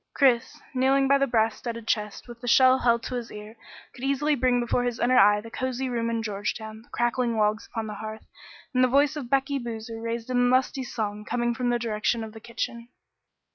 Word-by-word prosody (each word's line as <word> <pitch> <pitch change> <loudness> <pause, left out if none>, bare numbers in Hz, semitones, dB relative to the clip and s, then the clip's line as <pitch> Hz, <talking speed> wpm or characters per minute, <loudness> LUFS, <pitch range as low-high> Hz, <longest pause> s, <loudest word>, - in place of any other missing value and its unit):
Chris, 270 +2 +2
kneeling 270 +1 +3
by 275 +1 +4
the 275 - +2
brass 225 -2 +2
studded 230 -2 -6
chest 210 +1 -2
with 240 -1 -11
the 245 - -7
shell 260 +2 +6
held 235 -1 +2
to - - -5
his 240 -2 -4
ear, 210 +1 -9 0.4
could 250 - -11
easily 280 +2 +1
bring 255 -2 +2
before 240 +1 0
his 245 -2 -2
inner 250 +1 +4
eye 205 +1 +6
the 225 +2 -10
cosy 260 +1 -2
room 230 -1 -1
in 230 -1 -1
Georgetown, 215 +1 -4
the 230 - -23
crackling 240 -1 0
logs 215 0 +1
upon 225 -2 -4
the 215 - -5
hearth, 215 +1 -7 0.5
and 255 0 +3
the - - +5
voice 285 +4 +3
of 275 -6 -6
Becky 275 +1 +1
Boozer 225 -1 -6
raised 230 +1 -4
in 245 0 +3
lusty 260 +1 +1
song 210 -4 -4
coming 240 +2 -1
from 245 0 -1
the 240 - +2
direction 225 0 -1
of 220 -1 -8
the 220 - -10
kitchen. 235 +1 -5
235 Hz, 215 wpm, -26 LUFS, 225-255 Hz, 0.5 s, shell